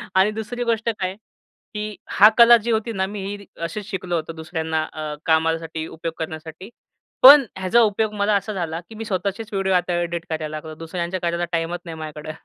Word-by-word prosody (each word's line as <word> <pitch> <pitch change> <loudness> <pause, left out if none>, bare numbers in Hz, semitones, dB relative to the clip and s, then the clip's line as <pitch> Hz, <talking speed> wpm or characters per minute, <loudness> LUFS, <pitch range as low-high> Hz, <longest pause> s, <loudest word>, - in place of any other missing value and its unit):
आणि 190 +3 +4
दुसरी 220 +3 -4
गोष्ट 230 -1 0
काय? 185 0 -2 0.6
की 210 0 -4
हा 210 +2 +7
कला 235 0 +9
जी 230 +1 -3
होती 225 +1 0
ना, 190 -1 0
मी 205 +1 -6
ही 200 +1 -4
रि 200 - -14 0.2
अशीच 190 +5 -4
शिकलो 185 -3 -3
होतं 165 0 -4
दुसऱ्यांना 160 -1 -2
अ, 155 - -9 0.3
कामासाठी 160 0 0
उपयोग 165 0 -6
करण्यासाठी. 160 +4 -7 0.5
पण 275 +1 +10
ह्याचा 190 +6 +3
उपयोग 215 0 +1
मला 205 0 +1
असा 200 +2 -1
झाला 170 -4 -3
की 225 - -11
मी 225 +1 -6
स्वतःचेच 200 +2 -2
व्हिडिओ 195 -1 +1
आता 180 0 +1
एडिट 170 0 -3
करायला 155 -1 -2
लागतो. 155 0 -8
दुसऱ्यांच्या 170 +2 -3
कार्याला 170 0 -1
टाईमच 165 +1 -1
नाही 165 -1 -7
माझ्याकडं. 155 0 -7
185 Hz, 195 wpm, -22 LUFS, 165-210 Hz, 0.6 s, पण